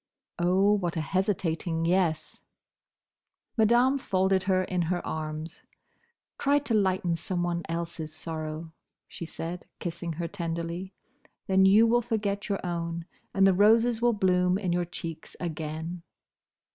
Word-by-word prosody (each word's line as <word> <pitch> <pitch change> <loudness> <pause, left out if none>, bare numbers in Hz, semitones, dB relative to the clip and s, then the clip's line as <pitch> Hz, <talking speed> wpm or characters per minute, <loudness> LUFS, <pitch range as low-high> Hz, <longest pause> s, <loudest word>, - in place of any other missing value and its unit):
Oh, 185 +4 +4
what 175 -5 -1
a - - +1
hesitating 170 -1 -1
yes! 170 -3 0 1.2
Madame 240 +4 +4
folded 190 -4 +2
her 185 0 +3
in 180 -1 -1
her 175 +1 -1
arms. 155 +1 -5 0.8
"Try 285 +1 +3
to 285 -5 0
lighten 185 -4 +2
someone 175 0 -1
else's 165 -1 -4
sorrow," 160 0 -5 0.3
she 170 - -7
said, 170 +2 -6
kissing 170 -1 -4
her 170 +2 -3
tenderly, 170 +1 -4 0.5
"then 190 -1 +5
you 210 +4 +7
will 240 +1 +3
forget 210 -4 -2
your 195 -2 -2
own, 170 -1 -3 0.3
and 195 0 +4
the 195 - +6
roses 225 +4 +4
will 240 0 +4
bloom 180 -2 +2
in 185 -4 -1
your 175 0 +1
cheeks 165 -2 -7
again." 160 +1 -4
180 Hz, 135 wpm, -28 LUFS, 165-195 Hz, 1.2 s, you